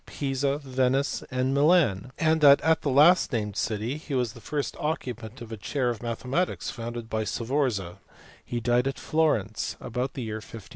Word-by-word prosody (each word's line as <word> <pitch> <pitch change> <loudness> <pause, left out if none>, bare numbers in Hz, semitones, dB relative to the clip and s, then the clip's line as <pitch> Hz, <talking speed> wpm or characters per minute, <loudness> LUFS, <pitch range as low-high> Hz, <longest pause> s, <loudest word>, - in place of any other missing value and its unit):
213 140 - -4
Pisa, 140 +1 0
Venice, 130 +1 +1
and 130 +1 0
Milan; 140 - +3
and 160 -1 +2
that 140 -1 +8
at 160 0 +2
the 145 - -1
last 150 +7 +5
named 105 -5 -2
city 110 +6 -2
he 155 -2 -5
was 125 -3 0
the 115 - -13
first 145 +2 -3
occupant 125 -7 -4
of 115 -1 -9
a 110 - -5
chair 125 +4 -1
of 115 - -7
mathematics 125 +9 -2
founded 115 -1 -6
by 110 -1 -1
Sforza: 115 -7 -1 0.4
he 120 - -3
died 120 +2 +2
at 135 - -3
Florence 110 -10 0
about 125 +3 -3
the 130 - -4
year 110 -1 -4
1510. 110 -1 -11
125 Hz, 185 wpm, -27 LUFS, 115-140 Hz, 0.4 s, that